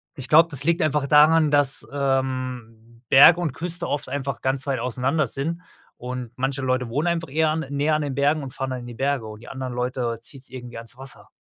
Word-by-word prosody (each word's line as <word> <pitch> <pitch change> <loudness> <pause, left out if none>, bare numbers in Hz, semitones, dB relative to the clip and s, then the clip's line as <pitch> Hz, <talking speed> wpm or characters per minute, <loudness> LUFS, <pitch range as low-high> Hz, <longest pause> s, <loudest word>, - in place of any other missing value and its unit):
ich 130 -4 -6
glaube, 160 +2 +7
das 145 -2 -3
liegt 170 +2 +1
einfach 150 -2 +1
daran, 155 +1 +5
dass, 145 -2 +2
ähm, 130 -4 -3
Berg 145 +5 +9
und 170 -4 -1
Küste 175 +2 -5
oft 145 -1 -2
einfach 135 -2 -3
ganz 130 0 0
weit 135 -3 -1
auseinander 130 +5 0
sind 165 +8 -3 0.4
und 125 -1 -6
manche 135 +1 -2
Leute 130 -1 0
wohnen 145 +8 -1
einfach 165 -3 -1
eher 155 +2 +2
an 160 +1 -1
näher 145 +2 +1
an 155 - 0
den 140 -3 -3
Bergen 145 +2 +1
und 135 -1 -8
fahren 135 -2 -4
dann 130 -1 -4
in 120 - -9
die 120 - -8
Berge 135 -1 -1
und 110 0 -10
die 120 - -12
anderen 130 -2 -5
Leute 125 -2 -2
zieht's 135 +2 -11
irgendwie 125 -2 -9
ans 115 +1 -9
Wasser. 135 0 -11
135 Hz, 220 wpm, -23 LUFS, 125-150 Hz, 0.4 s, Berg